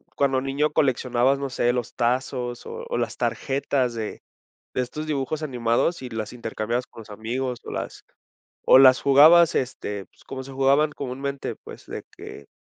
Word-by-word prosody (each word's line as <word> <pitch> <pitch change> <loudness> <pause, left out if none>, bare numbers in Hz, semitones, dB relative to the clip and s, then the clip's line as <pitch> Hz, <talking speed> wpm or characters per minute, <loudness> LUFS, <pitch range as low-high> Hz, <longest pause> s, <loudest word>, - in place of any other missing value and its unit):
cuando 135 -2 +2
niño 135 +3 0
coleccionabas, 130 -1 +2
no 140 0 -4
sé, 120 -1 +1
los 120 -2 -3
tazos 125 0 -2
o 475 +1 -7
o - - -1
las - - -2
tarjetas 135 -2 -1
de 110 -2 -5 0.5
de - - 0
estos 150 +5 -6
dibujos 150 +1 -2
animados 125 +4 0
y 130 - -5
las 110 -2 -5
intercambiabas 120 0 -3
con 115 - -12
los 110 - -16
amigos 120 +4 -4
o - - -8
las - - -5 0.6
o - - +8
las 130 -1 +7
jugabas, 155 +5 +7
este, 105 -6 -3
pues, - - -26
como 130 -1 -6
se 135 - -10
jugaban 135 +3 +3
comúnmente, 140 0 -4
pues, - - -12
de - - -6
que 70 - -10
130 Hz, 170 wpm, -24 LUFS, 120-140 Hz, 0.6 s, o